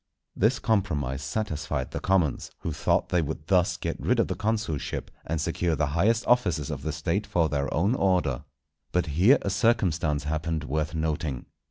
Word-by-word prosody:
This 115 +5 +3
compromise 75 - 0
satisfied 75 -4 -3
the - - -3
commons, 95 -6 +1
who 80 - -2
thought - - +1
they 90 - +2
would 75 0 -4
thus 90 0 +2
get - - -4
rid - - +2
of - - +2
the - - 0
consulship, 105 -8 -2 0.2
and 80 +1 -1
secure 85 +1 0
the 70 0 +1
highest 110 +8 +2
offices 90 - +2
of - - -4
the - - -2
State 100 +5 -1
for 85 -6 +1
their 70 -1 -1
own 95 +9 +2
order. 90 - +1 0.5
But 90 -1 +1
here 90 - +5
a 100 - -1
circumstance 90 - +1
happened 80 +1 -2
worth 75 +2 -2
noting. 80 -4 -2
80 Hz, 175 wpm, -27 LUFS, 75-100 Hz, 0.5 s, here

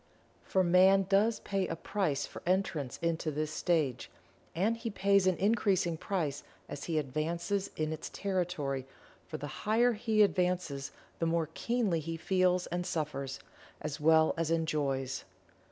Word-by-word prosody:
For 190 - +1
Man 190 +2 +5
does 205 +3 +3
pay 195 -1 -1
a 165 - -3
price 165 -5 -1
for - - -10
entrance 175 -8 0
into 165 -1 0
this 155 +1 -2
stage 155 -9 0 0.5
and 205 +7 +2
he 230 0 -4
pays 200 -1 +3
an 185 - +2
increasing 195 -5 +2
price 155 -5 -2 0.3
as 145 - -6
he 165 -2 -1
advances 165 +7 -1
in 155 0 -1
its 160 - -6
territory, 170 -9 -2 0.4
for - - -5
the 145 - -6 0.2
higher 240 +3 +4
he 215 -1 +3
advances 180 -8 0 0.3
the 165 - +1
more 165 -1 0
keenly 230 -7 0
he 165 +1 -4
feels 185 +1 +2
and 175 +1 -3
suffers, 150 -6 -3 0.4
as 150 -2 -5
well 160 +1 +5
as 165 -1 0
enjoys. 145 -5 -1
170 Hz, 150 wpm, -31 LUFS, 155-195 Hz, 0.5 s, Man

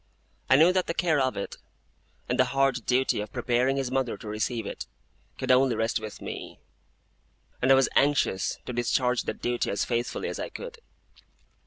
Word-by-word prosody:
I 130 - +7
knew 165 +6 +6
that 185 -1 +1
the 165 - -2
care 160 -4 +2
of 130 -1 0
it, 100 - -5 0.7
and 125 - -1
the 130 - +6
hard 135 -4 +2
duty 130 -3 +2
of 105 -1 -7
preparing 125 +4 +1
his 135 -2 -2
mother 130 -5 -1
to 110 - -11
receive 110 +2 -2
it, - - -6 0.5
could 130 0 0
only 130 -1 +4
rest 115 +1 0
with 110 -1 -8
me; - - -7 1.0
and 130 - +4
I - - +9
was 135 0 +4
anxious 135 -9 +2
to 125 - -5
discharge 125 +1 +1
that - - -5
duty 120 0 0
as 100 - 0
faithfully 120 0 -2
as - - -5
I - - -4
could. 475 -1 -8
125 Hz, 185 wpm, -27 LUFS, 120-135 Hz, 1.0 s, I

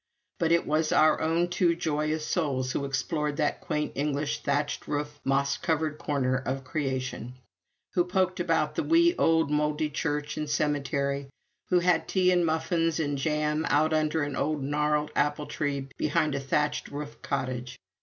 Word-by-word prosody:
But 165 -1 +1
it 170 - +3
was 155 +1 +1
our 155 - +4
own 165 +2 +2
two 175 -1 +2
joyous 155 -1 -1
souls 130 -6 -1
who 140 - -2
explored 145 +2 -1
that 150 +2 0
quaint 155 -5 -2
English 145 +1 -1
thatched 145 +1 -1
roof, 145 0 -3
moss 135 0 +1
covered 155 -2 -1
corner 130 -3 0
of 135 0 -3
creation; 130 -3 -3 0.6
who 175 - +3
poked 185 0 0
about 165 -3 +1
the - - -1
wee 340 +1 +4
old 160 -2 +3
mouldy 150 +1 0
church 150 0 -2
and 150 -1 -3
cemetery; 140 -2 -1 0.4
who 180 -1 +4
had 175 -2 +2
tea 185 -1 +3
and 175 -2 +3
muffins 165 0 0
and 145 -3 -1
jam 150 +1 0
out 155 +2 +3
under 155 0 +1
an 145 -1 -3
old 150 -1 -1
gnarled 150 +1 0
apple 150 0 +1
tree 140 -3 -2
behind 155 0 +1
a 140 - -1
thatched 150 +2 0
roof 145 +1 -7
cottage. 125 -2 -3
150 Hz, 165 wpm, -28 LUFS, 140-160 Hz, 0.6 s, our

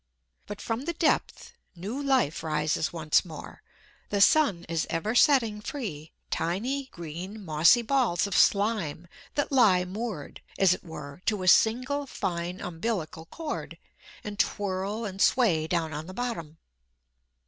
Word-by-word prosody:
But 205 - -7
from 235 +3 -3
the 340 - -2
depth 325 -1 0 0.2
new 205 +11 -5
life 265 - +1
rises 155 0 0
once 160 -3 +2
more; 160 -4 -10 0.5
the 205 - 0
sun 205 - +4
is 165 -1 -1
ever 205 +7 -1
setting 240 -6 +4
free 190 - -6 0.2
tiny, 240 +12 -1
green, 180 +4 -8
mossy 165 +9 +5
balls 235 -9 +1
of 200 -3 -3
slime 200 -6 +2 0.3
that 290 - 0
lie 205 -9 +5
moored, 195 -5 -6 0.2
as 190 -2 +5
it - - -7
were, 150 -2 -9
to 210 -4 +1
a - - -3
single 255 +9 +3
fine 175 -4 -3
umbilical 165 -3 -4
cord, 315 - -6 0.5
and 210 0 -7
twirl 200 +3 -1
and 195 -1 -5
sway 175 -12 +3
down 165 -2 -1
on 155 +2 -5
the 185 - -9
bottom. 195 -11 -4
195 Hz, 140 wpm, -27 LUFS, 165-235 Hz, 0.5 s, mossy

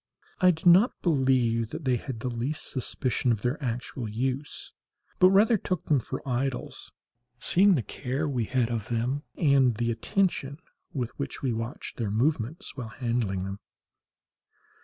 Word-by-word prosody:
I 185 - +6
do 170 0 0
not 190 +8 +6
believe 130 - +2
that 155 +2 -7
they 125 -2 +2
had 115 -1 -6
the 125 - -2
least 125 +6 -3
suspicion 125 -1 -1
of 110 -3 -1
their 135 +5 -1
actual 120 -1 -3
use, 130 +6 -3 0.5
but 185 - +8
rather 210 +3 +5
took 185 -2 -3
them 145 -3 +3
for 125 - -6
idols, 130 +1 -3 0.5
seeing 190 +8 +4
the 125 - 0
care 135 +8 -3
we 125 -5 -1
had 125 0 0
of 110 -3 -3
them, 120 +4 -1 0.2
and 135 -6 +4
the 120 +1 0
attention 140 - 0 0.3
with 125 -4 -3
which 140 - -5
we 130 -3 +1
watched 115 +2 -5
their 115 -4 -1
movements 125 - -1
while 125 -4 -5
handling 110 -4 -1
them. 95 +1 -5
130 Hz, 160 wpm, -27 LUFS, 115-145 Hz, 0.5 s, but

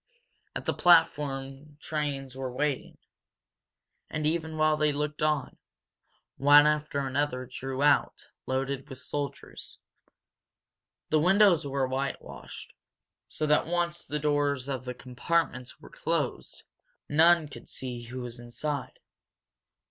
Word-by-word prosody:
At - - -4
the - - +1
platform 145 -4 +2
trains 140 -5 -3
were 130 -1 -4
waiting, 140 +1 -2 1.1
and, 155 0 -3
even 160 0 -1
while 155 0 +4
they 150 0 +2
looked 150 +1 -3
on, 150 -3 0 0.8
one 145 +2 +7
after 150 -2 0
another 130 -1 -1
drew 130 +2 -4
out, 145 -1 +2 0.2
loaded 135 +1 -2
with 130 - -8
soldiers. 145 +1 -6 1.3
The 155 - +3
windows 185 -2 +5
were 135 -1 0
whitewashed, 135 +2 -5 0.6
so 155 - -2
that, 150 0 +3
once 175 0 -1
the 150 - -3
doors 145 -3 0
of 130 -2 -4
the 125 0 -5
compartments 130 0 -2
were - - -14
closed, 160 -5 -2 0.4
none 160 +1 +5
could 145 - -12
see 125 -2 -5
who 125 +2 -6
was 120 0 -7
inside. 140 +5 -4
145 Hz, 120 wpm, -28 LUFS, 135-155 Hz, 1.3 s, one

